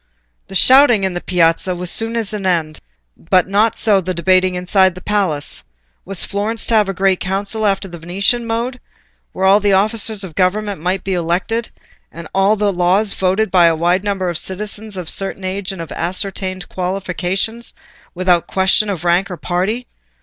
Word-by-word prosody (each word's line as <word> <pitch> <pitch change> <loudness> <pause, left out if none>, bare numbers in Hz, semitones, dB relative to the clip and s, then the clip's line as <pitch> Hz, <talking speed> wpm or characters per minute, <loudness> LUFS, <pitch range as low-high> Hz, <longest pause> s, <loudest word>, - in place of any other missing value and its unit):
The 195 - -9
shouting 255 -1 +6
in 190 -1 0
the 175 - -4
Piazza 175 +1 +1
was 180 0 -3
soon 225 +1 -1
at 220 -2 -3
an 210 -2 -4
end, 160 -4 -1 0.4
but 185 +2 +1
not 215 +3 +2
so 205 -3 +3
the 185 0 -4
debating 185 +1 +2
inside 185 0 +2
the 185 - -10
palace: 165 - -1 0.4
was 195 -1 +1
Florence 210 +2 -2
to - - -1
have 210 -3 +3
a - - -1
Great 190 -1 +2
Council 200 +3 -1
after 195 0 0
the 170 -2 -10
Venetian 200 +8 -1
mode, 235 +3 -3 0.5
where 190 - -2
all 195 +2 +6
the 205 -1 +2
officers 215 +1 +1
of 180 -4 -8
government 195 +1 -1
might 185 +2 -1
be 190 - -2
elected, 180 +7 -1 0.4
and 165 -1 -9
all 195 +2 +3
laws 195 0 +1
voted 190 +2 0
by 175 -3 +5
a 165 - +2
wide 175 +4 +1
number 195 -3 -1
of 170 -2 +1
citizens 205 +1 -5
of 180 - -5
a - - -5
certain 195 0 -2
age 190 +1 -3
and 180 -3 -6
of 165 - -12
ascertained 185 0 -3
qualifications, 190 +4 -3 0.4
without 180 -1 +2
question 195 +2 +2
of 180 -4 -4
rank 175 +4 +2
or 180 - -6
party? 195 +9 -2
190 Hz, 185 wpm, -17 LUFS, 180-210 Hz, 0.5 s, shouting